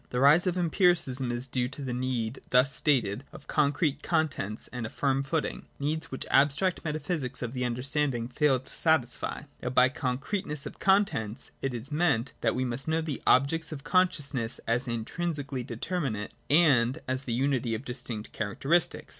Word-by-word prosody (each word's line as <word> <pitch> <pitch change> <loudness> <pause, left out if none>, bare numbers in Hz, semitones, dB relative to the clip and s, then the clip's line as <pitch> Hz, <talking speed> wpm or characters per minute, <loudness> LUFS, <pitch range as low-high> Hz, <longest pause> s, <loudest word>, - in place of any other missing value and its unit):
The 125 - -2
rise 150 +7 +6
of 180 0 0
Empiricism 165 -7 +2
is 120 +1 -1
due 125 -1 -1
to 140 +2 -9
the 130 -2 -3
need 125 -1 -2
thus 130 +2 +4
stated 125 -5 +1
of - - -12
concrete 145 +1 +1
contents, 150 - -1
and 125 -3 -4
a - - -9
firm 135 +1 0
footing 150 +3 -2
— - - -35
needs 155 +3 -2
which 130 - -3
the - - -1
ab 145 +2 +6
stract 180 +6 -1
metaphysic 150 -4 -2
of 120 0 -4
the 125 -1 -1
understanding 125 0 -1
failed 130 0 +1
to - - -5
satisfy. 155 -7 +1 0.2
Now 125 - -2
by 125 0 +5
concreteness 145 +3 -3
of - - -8
contents 145 - +1
it 135 - -1
is 120 +5 -3
meant 150 -6 +1
that - - +1
we 130 +1 0
must 125 +3 -2
know 160 +1 +1
the 155 -4 -4
objects 145 +6 +3
of 140 -3 -7
consciousness 145 -10 +1
as 120 +3 +1
intrinsically 140 +3 -3
determinate 120 - -3 0.2
and 135 -6 +4
as 130 +1 -1
the 120 - -2
unity 125 -2 0
of 115 +5 -7
distinct 120 -3 -5
characteristics. 140 - 0
135 Hz, 180 wpm, -28 LUFS, 125-155 Hz, 0.2 s, rise